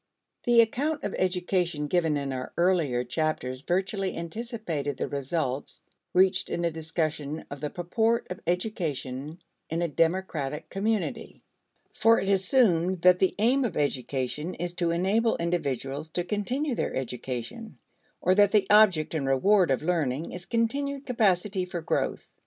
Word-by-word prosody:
The 240 -1 +7
account 285 +7 -1
of 205 - -3
education 180 -4 0
given 160 -1 +1
in 140 -1 -3
our 130 -1 -5
earlier 170 -9 +2
chapters 130 -2 -2
virtually 190 +3 -1
anticipated 170 - -4
the - - -2
results 140 -1 -3 0.3
reached 190 +1 +3
in 170 - -1
a 170 - +1
discussion 155 -1 -3
of 140 -1 -7
the 150 - -2
purport 220 +8 0
of 180 - -5
education 160 - -2 0.3
in 165 +2 -1
a - - +1
democratic 160 -3 -1
community. 210 +1 -2 0.5
For 230 0 +4
it 195 - -2
assumed 190 -4 +2
that 180 0 +6
the 190 - +2
aim 250 +6 +3
of 225 -9 -2
education 140 +3 -2
is 175 0 -4
to 175 -1 0
enable 195 +7 +2
individuals 150 -3 -2
to 175 - 0
continue 245 - -1
their - - -2
education 130 - -5 0.4
or 185 - +4
that 205 +1 +4
the 205 -3 +4
object 195 -8 +5
and 145 -4 -1
reward 180 +8 +4
of 135 +2 +1
learning 155 -3 -1
is 180 -1 -7
continued 275 +4 -1
capacity 200 -5 +1
for 180 -1 -4
growth. 160 - -1
175 Hz, 145 wpm, -27 LUFS, 150-205 Hz, 0.5 s, The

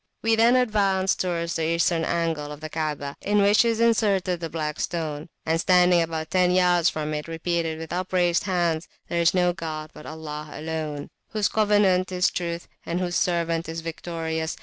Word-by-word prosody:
We 225 0 +3
then 230 +2 +5
advanced 200 -6 +2
towards 170 -2 -1
the 165 +1 0
eastern 170 -1 +1
angle 165 -3 -1
of 150 - -8
the 155 0 -7
Kaabah, 150 -3 -3
in 205 +1 +1
which 205 +3 +5
is 230 -1 0
inserted 200 -6 +2
the 165 -1 -4
Black 155 -1 -3
Stone; 155 -2 -3 0.2
and, 165 +1 +1
standing 180 -1 +5
about 160 -1 -3
ten 180 -1 +3
yards 180 -2 +4
from 155 0 -3
it, 150 +1 -4
repeated 165 0 -2
with 160 0 -7
upraised 180 -1 +1
hands, 175 -4 0 0.2
There 170 - 0
is 170 +2 +3
no 180 -1 +3
god 155 -3 -6
but 150 - -11
Allah 155 -1 -7
alone, 155 -2 -4 0.2
Whose 215 -2 +1
Covenant 205 -4 +3
is 180 0 +2
Truth, 170 -1 -4 0.2
and 170 +1 -2
Whose 175 -1 -2
Servant 170 -2 0
is 165 0 -4
Victorious. 160 0 -4
170 Hz, 180 wpm, -25 LUFS, 160-185 Hz, 0.2 s, then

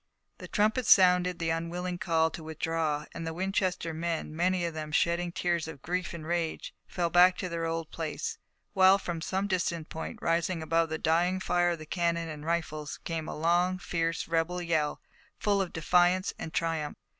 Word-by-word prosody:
The - - -8
trumpets 215 +3 +1
sounded 180 -1 +6
the 165 -1 -1
unwilling 175 +2 -3
call 160 -1 +2
to - - -7
withdraw, 160 -1 -2
and 165 - -5
the 160 - -4
Winchester 185 -2 -1
men, 165 -1 -3
many 180 +1 +1
of 170 - -3
them 155 -1 -5
shedding 170 +2 +1
tears 170 -2 -1
of 145 -4 -9
grief 180 +1 -2
and 160 -2 -8
rage, 170 -1 -2
fell 170 -2 -1
back 180 +1 +6
to 185 - -3
their 165 -1 -2
old 165 -1 -3
place, 155 -2 -4 0.3
while 190 0 +6
from 175 -4 -4
some 190 +3 -1
distant 170 -4 -1
point, 160 - -6
rising 165 0 0
above 165 +1 +1
the 160 - -2
dying 175 +4 +2
fire 175 -1 +2
of 170 - -1
the 155 - -9
cannon 170 0 -1
and 150 -1 -7
rifles, 155 -3 -2
came 165 -2 -3
the - - -5
long, 175 +3 +2
fierce 165 -2 -2
rebel 165 +2 0
yell, 160 -4 0 0.4
full 205 -2 +1
of 185 - -3
defiance 180 +3 +2
and 160 - -5
triumph. 165 -3 -1
170 Hz, 185 wpm, -29 LUFS, 160-180 Hz, 0.4 s, sounded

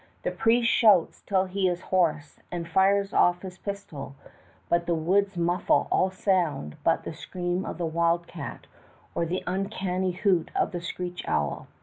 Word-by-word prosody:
The - - 0
priest 230 +1 +3
shouts 205 -8 +4
till 190 -1 +2
he 190 0 0
is 175 0 -3
hoarse 155 -6 0
and 170 -1 -4
fires 195 +3 +2
off 175 +1 +3
his 185 -1 -8
pistol; 200 -9 -6 0.5
but 170 0 +1
the 170 - +2
woods 195 +4 +1
muffle 175 +1 +2
all 185 - +3
sound 180 - 0
but - - +2
the - - -5
scream 180 +1 -3
of - - -5
the 175 - -2
wild 170 +1 +1
cat - - -8 0.5
or 170 - -1
the 180 +3 -2
uncanny 185 0 -1
hoot 180 -3 +1
of - - +1
the 175 - -4
screech 180 +1 -5
owl. 75 -1 -1
180 Hz, 165 wpm, -27 LUFS, 170-190 Hz, 0.5 s, shouts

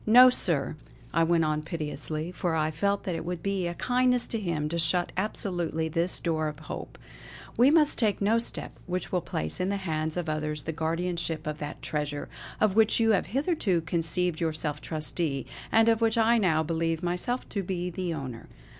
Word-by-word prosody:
No 250 +3 +9
sir" 155 - +1 0.4
I 165 - +3
went 165 -1 +3
on 155 0 0
pitilessly, 155 0 -3
for 175 -1 -1
I 155 0 +1
felt 200 +6 0
that 185 - -2
it 165 - -3
would 175 -1 -4
be 195 -3 0
a 170 - -4
kindness 250 +1 +2
to 225 - -2
him 165 -6 -1
to 170 +1 -2
shut 175 +2 +2
absolutely 175 -5 -1
this 170 +3 0
door 160 -2 0
of 150 -1 -5
hope, - - -7 0.6
"We 250 +3 +6
must 305 -1 +5
take 215 -4 +2
no 215 +3 +3
step 230 - -3 0.2
which 180 0 -3
will 180 - +1
place 80 - -3
in 185 - 0
the 200 - 0
hands 160 -3 -2
of 175 -2 -2
others 150 -1 -2
the 160 - -3
guardianship 165 0 -2
of 150 0 -4
that 145 0 -6
treasure, 150 -1 -2 0.3
of 210 -3 +2
which 220 0 +4
you 225 -1 +4
have 200 - +2
hitherto 250 - 0
conceived 170 +1 -1
yourself 155 -2 -2
trustee, 155 -2 -2 0.3
and 225 0 +5
of 225 0 +3
which 225 0 +2
I 230 +1 +4
now 160 -6 +2
believe 165 +1 -1
myself 180 +9 -2
to 200 - -2
be 180 -1 -3
the 180 0 -3
owner." 135 -7 -6
170 Hz, 195 wpm, -28 LUFS, 155-200 Hz, 0.6 s, No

